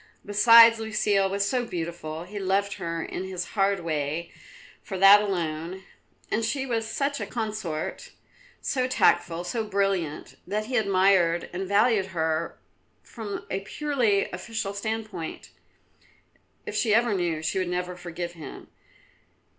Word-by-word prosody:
Besides, 230 Hz, +2 st, +7 dB
Lucile 210 Hz, -3 st, +1 dB
was 200 Hz, +1 st, 0 dB
so 250 Hz, +3 st, 0 dB
beautiful; 170 Hz, -5 st, -5 dB
he 205 Hz, +4 st, -7 dB
loved 195 Hz, +1 st, 0 dB
her 165 Hz, -1 st, -3 dB
in -, -, -5 dB
his 185 Hz, -2 st, -5 dB
hard 195 Hz, -2 st, +2 dB
way 155 Hz, 0 st, -2 dB, 0.5 s
for 190 Hz, -, -6 dB
that 195 Hz, +2 st, +8 dB
alone; 175 Hz, -2 st, -3 dB, 0.5 s
and 230 Hz, -, +1 dB
she 265 Hz, +4 st, -1 dB
was 225 Hz, -3 st, -1 dB
such 280 Hz, +5 st, -1 dB
a -, -, -3 dB
consort, 215 Hz, -9 st, -4 dB, 0.5 s
so 255 Hz, -1 st, 0 dB
tactful, 175 Hz, -9 st, +2 dB
so 225 Hz, +6 st, -2 dB
brilliant, 195 Hz, -7 st, -2 dB
that 210 Hz, +3 st, -2 dB
he 255 Hz, +3 st, -4 dB
admired 190 Hz, -5 st, +3 dB
and 190 Hz, +2 st, -3 dB
valued 200 Hz, 0 st, +3 dB
her 160 Hz, +1 st, -1 dB, 0.5 s
from 215 Hz, -4 st, -7 dB
a 190 Hz, -, 0 dB
purely 230 Hz, -2 st, 0 dB
official 200 Hz, +2 st, -4 dB
standpoint. 215 Hz, -4 st, -5 dB, 1.1 s
If -, -, -6 dB
she 215 Hz, -3 st, +3 dB
ever 235 Hz, -1 st, +3 dB
knew, 170 Hz, -4 st, -1 dB
she 160 Hz, -, 0 dB
would 185 Hz, -1 st, -1 dB
never 180 Hz, 0 st, -3 dB
forgive 175 Hz, -1 st, -6 dB
him. 160 Hz, -5 st, -10 dB
195 Hz, 140 wpm, -26 LUFS, 175-220 Hz, 1.1 s, that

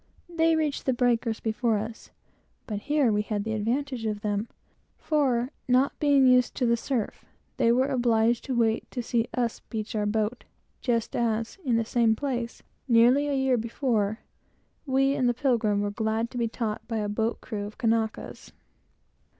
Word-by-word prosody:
They 330 Hz, -1 st, +2 dB
reached 305 Hz, -3 st, -1 dB
the 260 Hz, -, +3 dB
breakers 235 Hz, -2 st, +1 dB
before 225 Hz, 0 st, 0 dB
us; 220 Hz, +2 st, -6 dB, 0.6 s
but 210 Hz, -3 st, -4 dB
here 290 Hz, +1 st, +2 dB
we 210 Hz, 0 st, +2 dB
had 210 Hz, -1 st, -2 dB
the 220 Hz, +1 st, -3 dB
advantage 235 Hz, +2 st, -1 dB
of 210 Hz, -1 st, -3 dB
them, 210 Hz, +1 st, -1 dB, 0.5 s
for, 265 Hz, -5 st, +1 dB, 0.2 s
not 255 Hz, +2 st, +2 dB
being 285 Hz, -2 st, +4 dB
used 250 Hz, -1 st, +4 dB
to 250 Hz, -, 0 dB
the 235 Hz, 0 st, +3 dB
surf, 235 Hz, -1 st, -3 dB, 0.3 s
they 235 Hz, -3 st, +3 dB
were 255 Hz, +2 st, +3 dB
obliged 240 Hz, -3 st, +2 dB
to 260 Hz, -, -2 dB
wait 225 Hz, -2 st, +1 dB
to 245 Hz, -, -4 dB
see 230 Hz, 0 st, 0 dB
us 240 Hz, -3 st, -1 dB
beach 220 Hz, 0 st, -6 dB
our 210 Hz, -1 st, 0 dB
boat, 220 Hz, +3 st, -1 dB, 0.4 s
just 235 Hz, -3 st, -1 dB
as, 230 Hz, -, -1 dB
in 250 Hz, -5 st, +1 dB
the 230 Hz, 0 st, +1 dB
same 230 Hz, -1 st, +2 dB
place, 245 Hz, -2 st, -4 dB, 0.2 s
nearly 250 Hz, +4 st, +5 dB
a 285 Hz, -, 0 dB
year 265 Hz, -2 st, +2 dB
before, 225 Hz, -2 st, -1 dB, 0.7 s
we, 270 Hz, +1 st, +3 dB
in 255 Hz, -3 st, +1 dB
the 240 Hz, -, +1 dB
Pilgrim, 230 Hz, -6 st, +1 dB
were 205 Hz, 0 st, -1 dB
glad 220 Hz, +2 st, -1 dB
to -, -, -7 dB
be 235 Hz, -, +1 dB
taught 220 Hz, -2 st, -3 dB
by 230 Hz, -, -2 dB
a 210 Hz, -1 st, -1 dB
boat's 220 Hz, +3 st, -1 dB
crew 205 Hz, -3 st, -5 dB
of 210 Hz, -, -12 dB
Kanakas. 225 Hz, -1 st, -2 dB
235 Hz, 175 wpm, -27 LUFS, 220-255 Hz, 0.7 s, nearly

